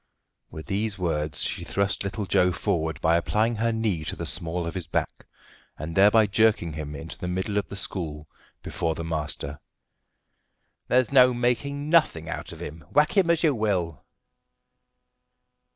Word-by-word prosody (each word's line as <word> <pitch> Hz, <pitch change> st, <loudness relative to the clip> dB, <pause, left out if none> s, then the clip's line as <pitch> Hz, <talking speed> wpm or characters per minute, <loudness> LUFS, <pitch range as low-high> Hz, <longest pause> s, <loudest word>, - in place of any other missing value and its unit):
With 80 Hz, -, -9 dB
these 105 Hz, +1 st, -1 dB
words 75 Hz, -4 st, -1 dB
she -, -, -3 dB
thrust 100 Hz, 0 st, 0 dB
little 100 Hz, +1 st, -3 dB
Joe 90 Hz, -1 st, +3 dB
forward 80 Hz, -4 st, -1 dB
by 85 Hz, +1 st, +4 dB
applying 110 Hz, +6 st, +1 dB
her 115 Hz, +1 st, +1 dB
knee 110 Hz, -8 st, -1 dB
to -, -, -3 dB
the -, -, -5 dB
small 85 Hz, 0 st, -2 dB
of 85 Hz, -, -4 dB
his 90 Hz, -3 st, -5 dB
back, -, -, -3 dB, 0.5 s
and 80 Hz, +3 st, -5 dB
thereby 105 Hz, +3 st, +6 dB
jerking 105 Hz, -5 st, +2 dB
him 75 Hz, -1 st, -6 dB
into 80 Hz, +3 st, -7 dB
the 90 Hz, -, -4 dB
middle 95 Hz, +3 st, -2 dB
of -, -, -5 dB
the -, -, -8 dB
school 80 Hz, -7 st, -4 dB, 0.4 s
before 80 Hz, -1 st, -2 dB
the 85 Hz, -, -5 dB
master. 75 Hz, -2 st, -4 dB, 1.3 s
"There's 125 Hz, +1 st, +2 dB
no 125 Hz, -2 st, +6 dB
making 140 Hz, +4 st, -1 dB
nothing 155 Hz, -, +3 dB
out 85 Hz, -, -5 dB
of -, -, -10 dB
him, 80 Hz, +2 st, -8 dB
whack 150 Hz, +6 st, +3 dB
him 190 Hz, -4 st, +4 dB
as 170 Hz, -1 st, +2 dB
you 155 Hz, -3 st, +4 dB
will." 90 Hz, -, -1 dB
95 Hz, 165 wpm, -26 LUFS, 80-110 Hz, 1.3 s, thereby